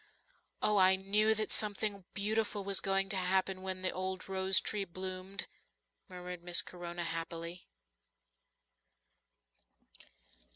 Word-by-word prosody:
"Oh, 210 -1 +4
I 190 0 +7
knew 210 +3 +3
that 215 0 -1
something 205 -2 +2
beautiful 210 0 0
was 195 0 +2
going 195 0 +1
to 195 - 0
happen 185 +1 +1
when 185 0 -4
the 185 - +2
old 185 0 -4
rose 190 0 +3
tree 210 -2 -2
bloomed," 185 +2 -5 0.6
murmured 180 -1 -7
Miss 175 0 +3
Corona 175 -1 -6
happily. 170 +1 -5
190 Hz, 115 wpm, -34 LUFS, 180-200 Hz, 0.6 s, I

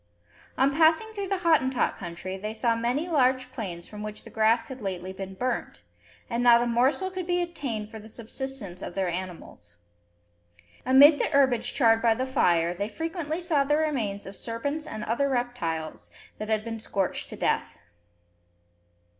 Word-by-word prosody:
On 270 +1 +3
passing 320 +8 +4
through 400 -2 -4
the 390 0 0
Hottentot 280 -7 +2
country, 185 0 -6
they 210 +3 -5
saw 230 +1 +2
many 245 +8 -1
large 260 -5 +2
plains 180 -8 -6
from 210 -1 -9
which 210 0 -6
the - - -12
grass 225 +1 +3
had 265 -2 -8
lately 190 -2 -4
been 190 0 -7
burnt; 250 +4 -3 0.4
and 235 +1 -1
not 240 -1 +7
a - - 0
morsel 260 +11 +1
could 370 -2 -5
be 355 0 +1
obtained 245 -11 -4
for 220 - -8
the 220 +1 -12
subsistence 230 -4 -6
of 175 - -6
their 190 -2 0
animals. 170 - -7 1.1
Amid 285 +3 +8
the - - +2
herbage 270 -5 +2
charred 225 -4 +4
by 230 -2 +4
the 255 +3 -1
fire, 175 - +2
they 200 +4 -3
frequently 325 - -3
saw 330 -6 +2
the 295 +2 +2
remains 240 -11 -1
of 195 - -9
serpents 280 +9 -4
and 215 - -5
other 275 +5 0
reptiles, 240 -12 -3 0.3
that 215 +1 -5
had 215 -1 +1
been 225 -1 -4
scorched 195 -3 -2
to - - -7
death. - - -1
235 Hz, 170 wpm, -27 LUFS, 205-280 Hz, 1.1 s, Amid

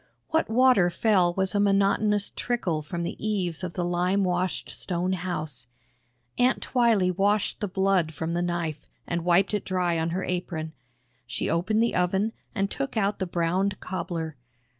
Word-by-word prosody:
What 320 +1 +1
water 235 -6 +5
fell 180 -1 +2
was 190 -1 +1
a 205 - +2
monotonous 200 +1 +2
trickle 185 -10 -1
from 170 +3 -4
the 170 - -5
eaves 190 -6 -1
of 175 -2 -4
the 175 - -2
lime 180 +3 +1
washed 180 0 -1
stone 180 +1 -2
house. 155 -8 -4 0.7
Aunt 250 +2 +3
Twylee 220 -8 +2
washed 205 +2 +1
the 210 - -1
blood 190 -3 +1
from 160 +1 -4
the 170 +1 0
knife 175 -3 -3 0.2
and 170 -1 -2
wiped 180 +4 +3
it 210 - 0
dry 180 -3 0
on 160 +1 0
her 180 +3 -2
apron. 160 -3 -3 0.5
She 120 - -2
opened 215 +7 +2
the 235 - +1
oven 190 +5 +1 0.2
and 195 -1 0
took 275 -4 -3
out 205 -1 +1
the 190 - -1
browned 180 +3 0
cobbler. 170 -4 -4
185 Hz, 165 wpm, -26 LUFS, 170-200 Hz, 0.7 s, water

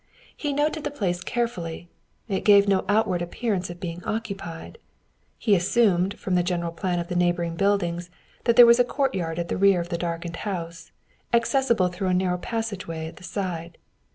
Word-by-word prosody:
He 290 - -2
noted 300 +2 0
the 295 - -1
place 185 -11 -2
carefully; 180 -7 -3 0.4
it 195 -3 -2
gave 200 -1 +6
no 195 -1 +2
outward 205 -4 +2
appearance 185 +1 -2
of 175 0 -8
being 175 0 -6
occupied. 200 - -5 0.6
He 215 - +2
assumed, 190 0 +2
from 190 - -3
the 180 - +4
general 175 -1 -1
plan 175 +2 -2
of 170 0 -3
the 180 - -4
neighboring 175 -1 +1
buildings, 175 -2 0 0.4
that 235 - +3
there 245 - +10
was 235 +1 +6
a - - +7
courtyard 195 - -1
at 170 0 -2
the - - -2
rear 195 -1 +5
of 170 0 -4
the 170 -2 -2
darkened 170 0 -4
house, 170 -4 -5 0.4
accessible 235 -5 +2
through 180 +2 -3
a 180 - +2
narrow 180 -1 0
passageway 200 -8 -4
at 160 - -9
the - - -14
side. 175 -4 -4
180 Hz, 180 wpm, -25 LUFS, 170-220 Hz, 0.6 s, there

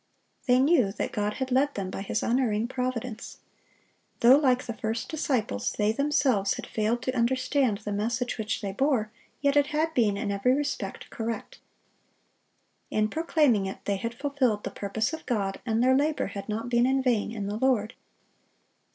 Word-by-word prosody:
They 250 0 +5
knew 265 - +4
that - - -3
God 210 0 -1
had 260 -1 -3
led 280 +3 +2
them 190 -2 -3
by - - -5
His 200 +2 -2
unerring 230 -3 +1
providence. 250 -3 -4 0.8
Though, 250 +3 +8
like 255 -4 +2
the 235 - -4
first 225 +1 -3
disciples, 255 - -1
they 210 0 +1
themselves 260 -6 +1
had - - -6
failed 225 +3 -1
to 255 0 -2
understand 255 -1 +1
the 210 - -6
message 235 +4 -2
which 220 0 -2
they 200 -2 -3
bore, 230 -1 +1 0.3
yet 280 0 +2
it 290 -1 +4
had 310 +2 0
been 210 -7 +2
in 200 -1 -2
every 200 +6 +2
respect 280 -9 -4
correct. 225 0 -5 1.3
In 215 0 +1
proclaiming 295 - +2
it 190 - -8
they 200 -1 0
had 230 +3 -4
fulfilled 260 -6 0
the - - -4
purpose 215 +6 -2
of 320 - -5
God, 200 -6 -1
and 225 +1 +2
their 260 +1 +5
labor 295 +2 +1
had 200 +1 -7
not 225 +3 -3
been 240 0 +3
in 265 0 +1
vain 235 -5 +1
in 210 -3 -4
the 205 +1 -3
Lord. 235 -3 +1
235 Hz, 175 wpm, -27 LUFS, 210-265 Hz, 1.3 s, Though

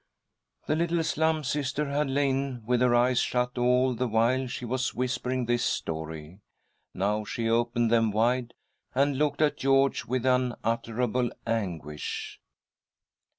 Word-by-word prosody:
The 155 - +1
little 170 0 +1
Slum 160 0 +1
Sister 140 +1 -1
had 145 0 0
lain 135 -3 0
with 125 +1 +1
her 125 -1 +4
eyes 125 +1 +3
shut 125 0 0
all 125 +1 +3
the 125 +2 -1
while 120 +4 +2
she 125 0 -5
was 130 +2 -2
whispering 125 0 -1
this 120 0 +1
story. 80 -4 -4 0.6
Now 105 +3 0
she 115 +2 -3
opened 120 0 +1
them 115 -1 +4
wide, 120 +3 0 0.4
and 140 0 +2
looked 150 0 +1
at 150 - +1
George 135 0 +2
with 130 0 -2
unutterable 120 -1 0 0.2
anguish. 85 -10 -4
125 Hz, 135 wpm, -27 LUFS, 115-135 Hz, 0.6 s, her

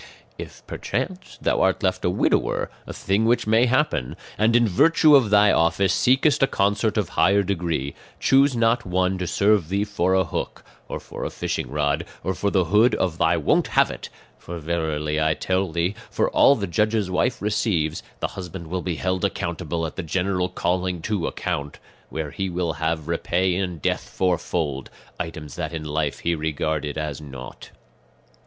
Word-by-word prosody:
"If - - -9
perchance 185 0 -4
thou - - +2
art - - +2
left - - 0
a - - +2
widower - - 0 0.2
a - - -5
thing 100 +3 0
which 120 +2 +2
may 110 +3 +4
happen 130 - 0 0.2
and 110 +2 +2
in 120 -1 +5
virtue 150 - +5
of 125 -6 +4
thy 105 0 +5
office 85 +3 +2
seekest 130 - +3
a 135 - +5
consort 105 +1 +1
of 105 - 0
higher 100 +1 +3
degree, 85 -7 -2 0.3
choose 135 0 +4
not 115 +1 +2
one 95 +1 0
to 90 - -2
serve 100 -1 +2
thee 100 +2 +1
for 95 -3 0
a 95 - +4
hook, 85 - -5 0.2
or - - -5
for - - -8
a - - -2
fishing - - -3
rod, 75 0 0 0.2
or 95 - -1
for 100 - -1
the 95 -2 +2
hood 105 +8 +4
of 85 -3 -1
thy - - +3
'won't - - +2
have - - +5
it;' - - -8 0.3
for 85 - -7
verily, 80 -2 -2
I 80 0 +2
tell 95 -1 -1
thee, 85 +4 0 0.2
for - - 0
all 140 - +6
the 100 - -3
judge's 105 +1 0
wife 90 - 0
receives, 100 -6 0 0.2
the - - 0
husband 90 -3 -8
will 90 0 -1
be 90 -2 -3
held 95 +2 -2
accountable 85 -1 -2
at 80 - -7
the - - -1
general 90 +2 -1
calling 90 -1 -1
to 105 -5 -1
account; 70 0 -3 0.3
where 80 -2 -4
he 95 -1 -3
will 85 -2 -1
have 80 -1 -1
repay 90 +2 0
in 90 -2 -2
death 75 - -2
fourfold, 85 -6 -1 0.3
items 75 -4 -6
that - - -3
in 80 -1 -5
life 75 -1 -2
he 85 - +1
regarded 75 -1 -2
as 75 -1 -4
naught. 65 -4 -10
90 Hz, 180 wpm, -23 LUFS, 80-105 Hz, 0.3 s, all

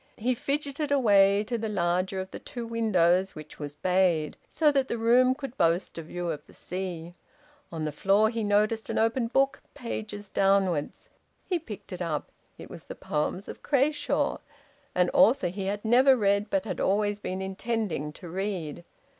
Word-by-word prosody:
He 245 +4 +1
fidgeted 285 +2 -2
away 200 -6 +5
to 230 +2 -3
the 220 0 -3
larger 185 0 0
of 190 0 -6
the - - -7
two 240 -2 -7
windows, 195 -5 +2
which 155 0 -11
was 145 -1 -6
bayed, 180 -3 +1
so 305 -2 +3
that 275 -2 +1
the 235 - -2
room 250 +3 +4
could 270 -3 -7
boast 170 +2 +1
a - - -4
view 175 +2 -4
of 150 -2 -6
the - - -15
sea. 175 -2 -5 0.6
On 160 -2 -3
the 150 - -2
floor 200 +8 +3
he 230 -1 -2
noticed 210 +2 +1
an - - -2
open 230 +2 +1
book, 270 +3 +1
pages 215 -5 -6
downwards. 195 -6 +1 0.4
He 360 -3 0
picked 215 - -9
it 180 - -6
up. 155 -4 -3 0.3
It - - -10
was - - -11
the - - -8
poems 155 +6 -2
of - - -9
Crashaw, 290 +2 +1 0.6
an 180 -1 +3
author 230 -5 +5
he 190 +2 -4
had 205 +2 -3
never 255 +4 +5
read 200 -1 +1
but 195 +1 0
had 215 - -4
always 205 +1 +1
been 185 -2 -4
intending 190 - -2
to 175 - -10
read. 175 -3 -4
200 Hz, 180 wpm, -27 LUFS, 180-230 Hz, 0.6 s, away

